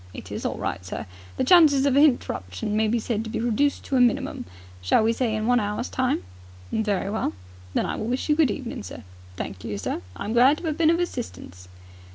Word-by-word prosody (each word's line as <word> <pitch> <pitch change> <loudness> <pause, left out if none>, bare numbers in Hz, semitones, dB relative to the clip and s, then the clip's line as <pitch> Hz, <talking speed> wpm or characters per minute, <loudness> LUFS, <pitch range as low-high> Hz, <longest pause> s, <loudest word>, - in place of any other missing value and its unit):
"It - - -9
is - - -2
all - - -4
right, - - -3
sir. 95 - -6 0.3
The - - +1
chances 285 -3 +6
of 275 -2 +3
a - - +6
hinterruption 210 - +1
may 220 0 +2
be 230 +3 +1
said 220 -1 -2
to 220 - -7
be - - -3
reduced 240 +5 +1
to 270 - 0
a - - +5
minimum. 245 -2 +1 0.4
Shall 90 - +3
we 225 +1 +3
say 230 -2 0
in 215 0 -2
one 245 +1 +4
hour's 210 +3 -2
time?" 255 - 0 0.5
"Very 205 -3 0
well." 215 - -1 0.4
"Then - - +2
I - - -2
will 220 - -3
wish 250 +2 -2
you 300 - +3
good 305 -4 +4
evening, 240 +2 -4
sir. 205 - -9 0.3
Thank 95 +1 -6
you, 105 -3 -4
sir. 95 -2 -3
I - - -6
am 220 - -2
glad 255 +5 +5
to 335 - -5
'ave 310 - -1
been 325 -2 +4
of 335 +1 +3
assistance." 225 - -5
235 Hz, 230 wpm, -25 LUFS, 210-275 Hz, 0.5 s, chances